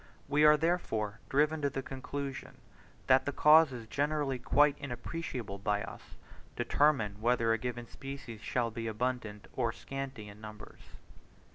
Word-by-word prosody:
We 145 Hz, +2 st, +3 dB
are 150 Hz, 0 st, +8 dB
therefore, 110 Hz, -, -1 dB
driven 150 Hz, +3 st, +2 dB
to 140 Hz, -, +2 dB
the 135 Hz, 0 st, -4 dB
conclusion, 135 Hz, +1 st, -6 dB, 0.5 s
that 130 Hz, +1 st, +4 dB
causes 150 Hz, -6 st, +5 dB
generally 145 Hz, +1 st, -1 dB
quite 145 Hz, +3 st, +4 dB
inappreciable 125 Hz, -5 st, -5 dB
by 105 Hz, 0 st, 0 dB
us, -, -, -10 dB, 0.4 s
determine 110 Hz, -9 st, +2 dB
whether 115 Hz, -1 st, +3 dB
a 115 Hz, -, 0 dB
given 120 Hz, 0 st, -4 dB
species 135 Hz, -5 st, -8 dB
shall 120 Hz, -1 st, -1 dB
be 115 Hz, 0 st, -4 dB
abundant 110 Hz, -2 st, -3 dB
or 120 Hz, -3 st, +1 dB
scanty 135 Hz, -4 st, -6 dB
in 105 Hz, +1 st, -12 dB
numbers. 105 Hz, 0 st, -10 dB
125 Hz, 135 wpm, -32 LUFS, 110-145 Hz, 0.5 s, are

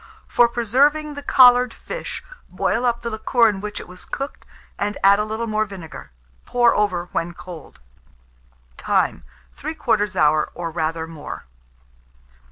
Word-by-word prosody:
For 240 Hz, -, +4 dB
preserving 280 Hz, +7 st, +2 dB
the 285 Hz, -, -7 dB
collared 250 Hz, -3 st, +6 dB
fish, -, -, -6 dB, 0.3 s
boil 240 Hz, -, 0 dB
up 235 Hz, 0 st, -1 dB
the 235 Hz, -, -3 dB
liquor 230 Hz, +2 st, +3 dB
in 200 Hz, -3 st, -1 dB
which 210 Hz, 0 st, -5 dB
it -, -, -10 dB
was 180 Hz, +1 st, -11 dB
cooked, 275 Hz, +1 st, -6 dB, 0.3 s
and 205 Hz, 0 st, -1 dB
add 200 Hz, +1 st, +6 dB
a -, -, +2 dB
little 220 Hz, +2 st, -3 dB
more 215 Hz, -1 st, 0 dB
vinegar. 165 Hz, -, -10 dB, 0.3 s
Pour 240 Hz, -1 st, +3 dB
over 180 Hz, -4 st, 0 dB
when 170 Hz, +1 st, -2 dB
cold. 175 Hz, -5 st, -11 dB, 1.0 s
Time. -, -, 0 dB, 0.3 s
3/4 230 Hz, -10 st, -1 dB
hour, 155 Hz, -2 st, +3 dB
or 170 Hz, -1 st, -4 dB
rather 160 Hz, 0 st, -2 dB
more. 160 Hz, -2 st, -8 dB
215 Hz, 145 wpm, -22 LUFS, 175-245 Hz, 1.0 s, collared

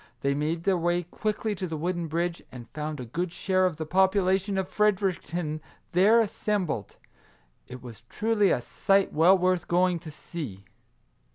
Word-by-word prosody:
They 140 Hz, 0 st, +1 dB
made 155 Hz, +4 st, -2 dB
their 190 Hz, -2 st, +2 dB
way 175 Hz, +1 st, +1 dB
quickly 215 Hz, +5 st, -2 dB
to 185 Hz, -1 st, -4 dB
the 160 Hz, -2 st, -4 dB
wooden 175 Hz, +1 st, -2 dB
bridge, 170 Hz, +2 st, -2 dB
and 120 Hz, -2 st, -10 dB
found 150 Hz, +1 st, -4 dB
a 125 Hz, -, -5 dB
good 170 Hz, +9 st, -3 dB
share 185 Hz, +1 st, +1 dB
of 170 Hz, -4 st, -4 dB
the 160 Hz, -, -4 dB
population 190 Hz, +2 st, +2 dB
of 190 Hz, -1 st, -1 dB
Fredericton 180 Hz, -6 st, 0 dB, 0.3 s
there 205 Hz, +6 st, +5 dB
assem 210 Hz, -2 st, -1 dB
bled. 110 Hz, -, -4 dB, 0.7 s
It 125 Hz, 0 st, -10 dB
was 120 Hz, -3 st, -10 dB
truly 210 Hz, -2 st, +2 dB
a 125 Hz, -, +1 dB
sight 195 Hz, -, +1 dB
well 175 Hz, +5 st, +6 dB
worth 180 Hz, -1 st, +1 dB
going 180 Hz, 0 st, +2 dB
to 165 Hz, -1 st, -10 dB
see. 145 Hz, -, -8 dB
175 Hz, 170 wpm, -27 LUFS, 155-190 Hz, 0.7 s, well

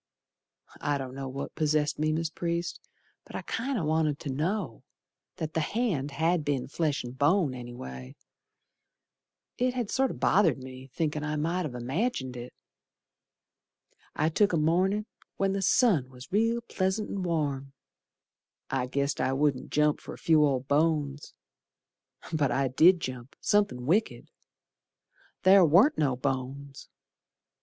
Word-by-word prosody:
I 145 Hz, -1 st, 0 dB
don't 130 Hz, -2 st, -6 dB
know 135 Hz, 0 st, -5 dB
what 135 Hz, +2 st, -6 dB
possessed 150 Hz, -1 st, 0 dB
me, 155 Hz, 0 st, +1 dB
Mis' 160 Hz, 0 st, -1 dB
Priest, 170 Hz, +1 st, -3 dB, 0.4 s
But -, -, -12 dB
I -, -, -4 dB
kinder 240 Hz, -4 st, -2 dB
wanted 155 Hz, -1 st, +1 dB
to 140 Hz, -, -4 dB
know 155 Hz, -, -2 dB, 0.5 s
That 155 Hz, -1 st, -5 dB
the -, -, 0 dB
hand 160 Hz, -, -1 dB
had 160 Hz, +4 st, +1 dB
been 140 Hz, -3 st, -1 dB
flesh 150 Hz, -1 st, -1 dB
and 120 Hz, +1 st, -8 dB
bone, 145 Hz, +1 st, +2 dB
anyway. 65 Hz, -, -8 dB, 1.4 s
It 250 Hz, 0 st, +1 dB
had 240 Hz, -5 st, -2 dB
sorter 265 Hz, -1 st, +1 dB
bothered 175 Hz, -8 st, +3 dB
me, 130 Hz, 0 st, -10 dB
thinkin' 150 Hz, 0 st, -2 dB
I 150 Hz, 0 st, -2 dB
might 165 Hz, +3 st, -1 dB
ha' 125 Hz, -, -9 dB
imagined 130 Hz, -, -2 dB
it. 120 Hz, 0 st, -7 dB, 1.6 s
I 155 Hz, +2 st, +2 dB
took 200 Hz, +4 st, +2 dB
a -, -, +3 dB
mornin' 185 Hz, +7 st, +2 dB, 0.3 s
when 195 Hz, 0 st, +1 dB
the 195 Hz, -, -1 dB
sun 180 Hz, -, +3 dB
was 130 Hz, +6 st, -13 dB
real 230 Hz, +4 st, +2 dB
pleasant 205 Hz, -1 st, -1 dB
and 195 Hz, -, -3 dB
warm; 145 Hz, -5 st, -2 dB, 1.0 s
I 130 Hz, -1 st, 0 dB
guessed 140 Hz, +2 st, -1 dB
I 130 Hz, -, +1 dB
wouldn't 135 Hz, -2 st, 0 dB
jump 150 Hz, 0 st, +2 dB
for -, -, -8 dB
a -, -, -15 dB
few 160 Hz, -2 st, +4 dB
old 135 Hz, -3 st, +1 dB
bones. 145 Hz, -1 st, 0 dB, 1.0 s
But 145 Hz, -4 st, +1 dB
I 135 Hz, -1 st, +1 dB
did 170 Hz, +7 st, +5 dB
jump, 130 Hz, 0 st, -6 dB
somethin' 200 Hz, -13 st, +1 dB
wicked. 200 Hz, -, 0 dB, 1.1 s
Ther 190 Hz, 0 st, +7 dB
warn't 180 Hz, -, +5 dB
no 135 Hz, -4 st, +2 dB
bones! 135 Hz, +1 st, -4 dB
150 Hz, 145 wpm, -28 LUFS, 135-180 Hz, 1.6 s, Ther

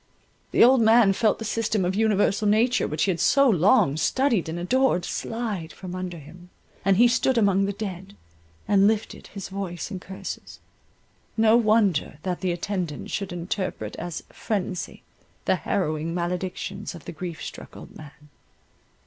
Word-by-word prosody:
The -, -, +5 dB
old 255 Hz, +1 st, +6 dB
man 220 Hz, -2 st, +5 dB
felt 215 Hz, +1 st, +2 dB
the 225 Hz, -, -6 dB
system 220 Hz, -3 st, 0 dB
of 180 Hz, -, 0 dB
universal 210 Hz, 0 st, +2 dB
nature 225 Hz, +4 st, +3 dB
which 150 Hz, +1 st, -1 dB
he 195 Hz, -, +2 dB
had 170 Hz, -, -3 dB
so 275 Hz, 0 st, +4 dB
long 195 Hz, -, +4 dB
studied 230 Hz, -, +1 dB
and 165 Hz, -, -4 dB
adored, 210 Hz, +1 st, +1 dB
slide 215 Hz, -8 st, -4 dB
from 185 Hz, -2 st, -9 dB
under 185 Hz, -1 st, -5 dB
him, 170 Hz, +4 st, -14 dB, 0.3 s
and 195 Hz, -1 st, +3 dB
he 240 Hz, +3 st, +7 dB
stood 240 Hz, +2 st, +1 dB
among 195 Hz, -3 st, +3 dB
the 200 Hz, -, -1 dB
dead, 190 Hz, -, -7 dB, 0.5 s
and 200 Hz, -1 st, +5 dB
lifted 220 Hz, 0 st, -2 dB
his 195 Hz, -2 st, -8 dB
voice 190 Hz, -1 st, -5 dB
in 190 Hz, -, -4 dB
curses.—No 220 Hz, +3 st, -4 dB
wonder 215 Hz, -10 st, +2 dB
that 180 Hz, -2 st, -3 dB
the 185 Hz, -2 st, 0 dB
attendant 175 Hz, -3 st, -4 dB
should 195 Hz, -3 st, -3 dB
interpret 175 Hz, -, -4 dB
as 175 Hz, -1 st, -5 dB
phrensy 185 Hz, -5 st, -3 dB, 0.4 s
the -, -, +2 dB
harrowing 155 Hz, +2 st, -2 dB
maledictions 180 Hz, +3 st, -4 dB
of 165 Hz, -, -12 dB
the -, -, -6 dB
grief 170 Hz, 0 st, -7 dB
struck -, -, -9 dB
old -, -, -12 dB
man. 150 Hz, 0 st, -14 dB
195 Hz, 155 wpm, -25 LUFS, 175-220 Hz, 0.5 s, he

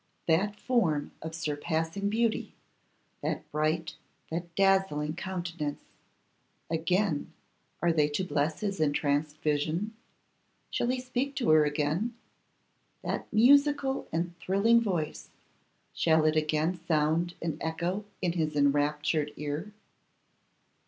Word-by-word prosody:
That 190 Hz, +6 st, +2 dB
form 185 Hz, -, +1 dB
of 160 Hz, 0 st, -6 dB
surpassing 160 Hz, +5 st, -1 dB
beauty: 225 Hz, +1 st, 0 dB, 0.7 s
that -, -, -3 dB
bright, 155 Hz, +1 st, -1 dB, 0.3 s
that 170 Hz, +1 st, -4 dB
dazzling 190 Hz, -6 st, +2 dB
countenance; 175 Hz, -5 st, -4 dB, 0.9 s
again 165 Hz, 0 st, 0 dB, 0.5 s
are 170 Hz, -1 st, +4 dB
they 150 Hz, -2 st, +3 dB
to 145 Hz, +5 st, -1 dB
bless 155 Hz, -3 st, -1 dB
his 200 Hz, -3 st, -2 dB
entranced 145 Hz, 0 st, +1 dB
vision? 155 Hz, +8 st, 0 dB, 0.8 s
Shall -, -, 0 dB
he 255 Hz, +1 st, 0 dB
speak 255 Hz, +2 st, -2 dB
to 245 Hz, -, +2 dB
her 155 Hz, -1 st, +6 dB
again? 155 Hz, +10 st, 0 dB, 0.9 s
That -, -, -3 dB
musical 275 Hz, +4 st, +4 dB
and 170 Hz, +2 st, -2 dB
thrilling 210 Hz, +6 st, +4 dB
voice, 175 Hz, -9 st, -2 dB, 0.6 s
shall 160 Hz, -1 st, +3 dB
it 155 Hz, 0 st, +3 dB
again 155 Hz, +3 st, +1 dB
sound 160 Hz, +2 st, +1 dB
and 160 Hz, -2 st, -3 dB
echo 170 Hz, +5 st, -2 dB, 0.2 s
in 175 Hz, -, +2 dB
his 155 Hz, -3 st, -1 dB
enraptured 150 Hz, +1 st, +2 dB
ear? 150 Hz, +7 st, -4 dB
165 Hz, 110 wpm, -29 LUFS, 150-195 Hz, 0.9 s, her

